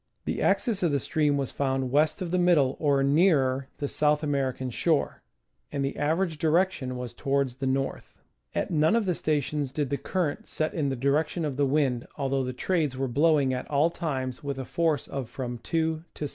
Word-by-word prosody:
The - - -2
axis 225 -6 +1
of 170 -4 +2
the 140 - +2
stream 150 0 +1
was 135 -2 -2
found 135 -2 -1
west 155 +6 +2
of 170 - -5
the 180 - +2
middle, 160 -7 +4
or 140 -3 +2
nearer 140 -3 +3
the 145 - -2
South 150 +1 +1
American 135 -3 -1
shore, 155 +5 0 0.5
and 140 -1 -1
the 135 - -3
average 160 +2 0
direction 160 -6 +1
was 125 -1 -6
towards 135 -1 -1
the 135 - -2
north. 135 +1 -2 0.4
At - - -1
none 160 +5 +3
of 230 -2 +2
the 180 - +1
stations 150 -3 -1
did 145 -1 -2
the 140 - +1
current 175 -4 -2
set 155 0 -1
in 145 -4 0
the 135 - -1
direction 150 +6 0
of 145 -3 -2
the 140 0 +2
wind, 135 -4 +1
although 135 -1 0
the 130 - -2
trades 150 0 -1
were 135 0 -1
blowing 140 +1 +3
at 125 - -4
all 150 +3 +3
times 130 -7 -3
with 140 -1 -3
a 135 - -4
force 160 -1 0
of 135 -4 -5
from 120 -2 -5
2 160 +4 -1
to - - -6
1. - - -4
145 Hz, 205 wpm, -27 LUFS, 135-160 Hz, 0.5 s, middle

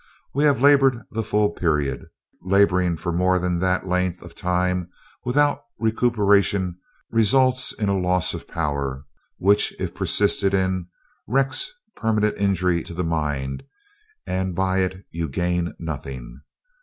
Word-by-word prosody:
We 145 +3 +2
have 145 -3 +3
labored 135 -4 +4
the 115 - -2
full 105 -2 +1
period. 75 -6 -1 0.3
Laboring 90 -2 +2
for 85 +2 -3
more 90 +2 +2
than 90 -1 -1
that 95 +1 0
length 90 -1 -1
of 90 -1 -12
time 90 0 -1 0.3
without 145 +4 +2 0.2
recuperation 100 -5 +2 0.3
results 130 +3 +3
in 105 - -3
a 100 - +2
loss 90 -1 +1
of - - -7
power 70 -4 -3 0.3
which, 100 +2 +3
if - - -3
persisted 100 -1 +1
in, 95 -2 0 0.4
wreaks 135 - +1 0.2
permanent 105 -2 +1
injury 90 -3 +1
to 85 - -9
the 90 - -1
mind; 75 -5 -2 0.6
and 95 -1 -2
by 95 +1 +1
it 95 +1 -2
you 85 -2 -3
gain 85 +3 -1
nothing. 65 -5 -7
95 Hz, 135 wpm, -23 LUFS, 85-105 Hz, 0.6 s, labored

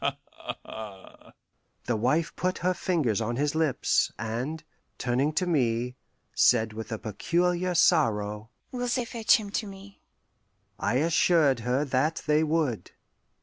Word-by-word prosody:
Ha, - - 0
ha, - - -7
ha 105 -4 -11 0.3
" - - -43
The 120 - 0
wife 130 +9 0
put 185 0 -1
her 185 - +3
fingers 150 - 0
on 115 +2 -2
his 145 +3 0
lips, 155 -4 +1
and, 120 +8 -4 0.3
turning 130 +4 0
to 180 - 0
me, 125 -6 0 0.4
said 110 -3 +3
with 110 +1 -7
a 110 - -2
peculiar 175 - -1
sorrow, 105 - +2 0.2
"Will 245 -1 -3
they 245 0 0
fetch 230 -1 +3
him 205 -3 -7
to 215 0 -2
me?" 195 0 -12 0.8
I 115 - 0
assured 155 -2 +3
her 125 +5 0
that 140 +4 0
they 150 +1 +3
would. 155 -7 -1
145 Hz, 150 wpm, -27 LUFS, 115-175 Hz, 0.8 s, her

